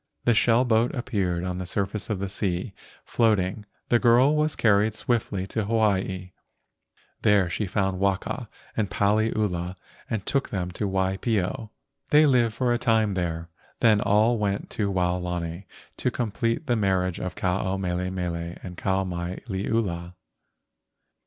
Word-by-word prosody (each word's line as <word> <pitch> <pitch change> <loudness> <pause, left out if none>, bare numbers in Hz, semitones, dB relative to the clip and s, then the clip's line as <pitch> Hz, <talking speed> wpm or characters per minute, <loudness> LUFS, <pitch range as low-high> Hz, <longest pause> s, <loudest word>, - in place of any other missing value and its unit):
The 120 - +5
shell 115 +2 +4
boat 115 +1 +2
appeared 100 -9 -1
on 90 0 -3
the 95 - -4
surface 100 +3 -2
of 105 - 0
the 100 +1 -3
sea, 95 0 -2 0.3
floating. 105 -3 +1 0.2
The 120 - +4
girl 125 +5 +5
was 155 0 +1
carried 105 -1 +3
swiftly 110 -6 -1
to 110 +2 -2
Hawaii. 95 -4 0 0.9
There 100 -5 +3
she 105 +3 -2
found 95 -1 0
Waka 95 -1 -1 0.3
and 105 -3 0
Paliula 100 -4 0 0.3
a;nd 105 -4 -2
took 140 -1 0
them 90 -3 -3
to 100 +3 -2
Waipio. 95 +4 -1 0.4
They 150 +1 +6
lived 120 -6 +3
for 120 0 +1
a 120 - 0
time 110 -4 +2
there, 85 -2 -3 0.3
then 110 -3 +5
all 110 +3 +3
went 100 -1 -2
to 100 -2 -1
Waolani 90 -1 -2 0.3
to - - 0
com¬ 115 -4 -3
plete 115 +9 -1
the 120 -4 +1
marriage 95 -4 +1
of 90 -3 -4
Ke - - -11
ao 95 +1 0
mele 90 -1 -2
mele 85 -2 -3
to 90 - -9
Kau 95 +1 0
mai 90 0 -4
liula. 95 -4 -2
100 Hz, 150 wpm, -26 LUFS, 90-110 Hz, 0.9 s, They